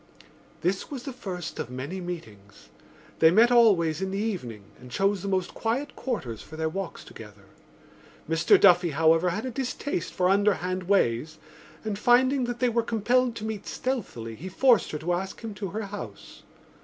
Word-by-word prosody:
This 190 +3 -1
was 270 -4 -6
the 270 - -6
first 180 -9 -6
of - - -4
many 140 +9 -5
meetings; 110 - -9 0.5
they 160 - +7
met 225 +8 +5
always 190 -9 +4
in 190 - -1
the 195 - -3
evening 170 - -3 0.2
and 125 - -12
chose 195 +8 +1
the 200 - -5
most 185 -2 -1
quiet 255 +6 -2
quarters 130 - -4
for 160 - -11
their 160 0 -1
walks 190 +2 -5
together. 105 -2 -13 0.8
Mr 165 +1 +4
Duffy, 175 -2 +6
however, 160 +3 +3
had 210 +8 -3
a 255 - -3
distaste 260 -5 -3
for 180 - +1
underhand 185 -2 +1
ways 155 -5 +1 0.5
and, 210 -2 -3
finding 255 +3 +4
that 240 0 -3
they 250 - +2
were 235 0 +1
compelled 235 +2 +1
to 220 - -5
meet 215 -2 -5
stealthily, 185 - -4
he 170 +12 -8
forced 240 +3 +3
her 150 - -3
to 165 +4 -1
ask 190 +2 -4
him 225 -2 -6
to 200 0 -5
her 215 +5 -4
house. 205 0 -9
190 Hz, 180 wpm, -26 LUFS, 160-225 Hz, 0.8 s, they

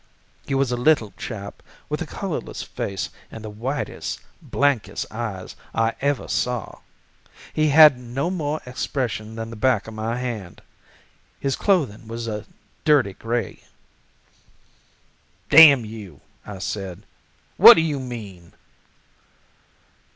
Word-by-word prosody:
He 135 - -1
was 135 -2 +1
a 125 - 0
little 120 -5 +2
chap, 100 -4 -7 0.3
with - - -3
a - - -3
colorless - - -5
face 95 -1 -4 0.2
and 110 -1 -9
the 105 - -6
whitest, 130 +7 -4 0.2
blankest 140 -6 0
eyes 110 -5 -5 0.2
I 115 0 +2
ever 140 0 0
saw. 125 -4 -2 0.7
He 155 0 +2
had 150 -3 +8
no 125 +8 -3
more 155 -4 -2
expression 120 -3 -3
than 115 0 -6
the - - -7
back 115 -1 +1
of 110 - -8
my 110 +2 -3
hand. 115 -8 -6 0.8
His 135 -1 -1
clothing 135 - 0
was 115 +1 -5
a 105 -1 -4 0.4
dirty 145 -10 +3
gray. 115 0 -3 1.9
"'Damn 145 -5 +9
you!' 105 -8 -10 0.3
I 105 -2 -7
said; 95 -1 -5 0.5
'what - - +11
do 165 - +3
you 150 -3 -1
mean? 105 -9 -8
120 Hz, 125 wpm, -23 LUFS, 105-140 Hz, 1.9 s, what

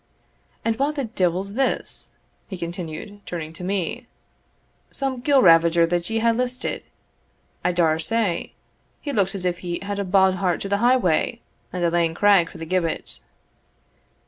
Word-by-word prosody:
And 225 -1 +1
wha 280 +2 +2
the 295 -2 -3
deevil's 190 -2 -1
this?" 270 +4 -1 0.4
he 190 - -6
continued, 175 +3 -6
turning 160 -2 -5
to 170 - -9
me 185 -1 -2 0.8
"Some 265 -2 -3
gillravager 170 - +5
that 175 0 -1
ye 225 - 0
hae 230 +1 +3
listed, 250 +2 -2 0.8
I - - +2
daur 165 -3 +2
say. 200 +1 -1 0.5
He 285 - -4
looks 200 -3 +1
as 185 -2 -3
if 175 -1 0
he 175 -1 -3
had 200 0 -3
a - - 0
bauld 190 0 +3
heart 180 -3 0
to 195 - -3
the 200 - +2
highway, 240 -3 +2 0.3
and 180 -1 -3
a 170 - +2
lang 165 -1 +1
craig 195 -3 +4
for - - -12
the 165 - -6
gibbet." 165 - -2
185 Hz, 160 wpm, -23 LUFS, 170-225 Hz, 0.8 s, gillravager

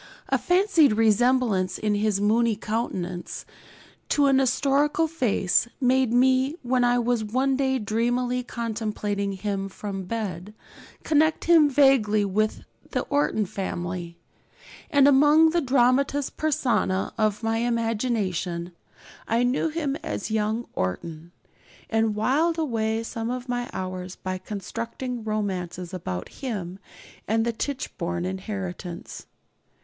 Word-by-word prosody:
A - - +2
fancied 355 - +4
resemblance 220 -3 +2
in 210 -1 0
his 205 -1 +1
moony 220 +2 +2
countenance 190 -5 -4 0.6
to 290 - +3
an 270 -1 +4
historical 280 +4 +2
face 240 - +1
made 260 -2 +2
me, 260 +3 +3
when 250 0 +1
I 245 0 +3
was 240 -1 +1
one 260 +5 +1
day 265 -1 +1
dreamily 245 +3 0
contemplating 215 -4 -3
him 195 0 -3
from 195 -1 -6
bed, 205 -1 -5 0.5
connect 315 +1 +2
him 325 -3 +6
vaguely 255 -7 +4
with 215 +2 -1 0.3
the - - -1
Orton 285 -7 +1
family; 175 -2 -5 0.7
and 285 -3 +5
among 295 +3 +6
the 340 0 +1
dramatis 270 +1 +2
personæ 230 -11 0
of 215 -1 0
my 225 0 +1
imagination 220 -7 -1 0.6
I 230 +2 +2
knew 255 +6 +1
him 305 -3 -2
as 210 - -5
young 220 +2 0
Orton, 155 - -4 0.6
and 225 -1 +1
whiled 295 +10 +1
away 225 -7 -1
some 225 0 -4
of 250 +1 -4
my 245 0 -2
hours 185 0 -5
by 185 0 -5
constructing 230 +5 -5
romances 185 -4 -3
about 90 - -4
him 195 -8 -5 0.5
and 225 +1 +1
the 235 - 0
Tichborne 180 -10 -3
inheritance. 185 -2 -6
225 Hz, 120 wpm, -25 LUFS, 195-260 Hz, 0.7 s, him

